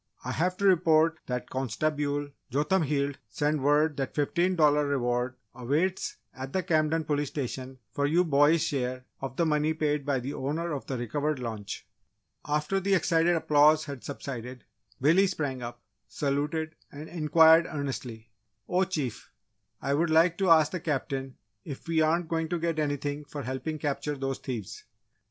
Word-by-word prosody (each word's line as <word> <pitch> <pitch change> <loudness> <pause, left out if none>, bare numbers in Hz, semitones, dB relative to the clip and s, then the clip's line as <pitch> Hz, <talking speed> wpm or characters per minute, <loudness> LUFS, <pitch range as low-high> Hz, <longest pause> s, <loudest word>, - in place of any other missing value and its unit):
I - - -2
have 180 +3 0
to 200 - -1
report 165 -3 +4
that 125 -1 -3
Consta_bule_ 145 +3 -1 0.2
Jotham 150 +8 +1
Heald 140 -2 -1
sent 145 +5 0
word 150 +2 +3
that 135 -1 -3
$15 150 -2 +2
reward 125 -2 0 0.2
awaits 145 +10 -1 0.2
at 130 +1 -7
the 185 - 0
Camden 160 -2 +1
Police 145 -1 -1
Station 130 -1 -5
for 140 +5 0
you 170 +5 +3
boys' 150 0 +4
share 130 -4 -2 0.2
of 135 -2 -5
the 170 - +2
money 155 0 +1
paid 150 -2 0
by 140 -2 0
the 135 +4 -5
owner 160 +5 -2
of 145 -3 -4
the 130 - -2
recovered 145 +6 -1
launch." 110 -5 -6 0.6
After 150 +6 0
the 195 +1 +2
excited 170 0 +3
applause 155 0 +4
had 140 -4 -7
subsided, 125 -3 -6 0.4
Billy 170 +8 +4
sprang 140 -7 -3
up, 120 0 -7 0.2
saluted, 150 +3 -2 0.2
and 150 +2 -8
inquired 160 0 +5
earnestly, 125 -7 -5 0.4
"Oh 185 +1 +2
Chief! 150 - -4 0.5
I 140 - +1
would 165 +4 +2
like 165 +2 +4
to 190 -2 +2
ask 155 -2 +6
the 180 - -3
Captain 135 -4 -3 0.3
if 140 0 -8
we 165 -1 +2
aren't 165 +2 +2
going 160 0 -1
to 175 - 0
get 165 -1 -1
anything 145 0 -2
for 145 0 -7
helping 130 +5 -3
capture 145 0 -2
those 135 0 -3
thieves?" 115 -8 -6
150 Hz, 160 wpm, -28 LUFS, 135-160 Hz, 0.6 s, ask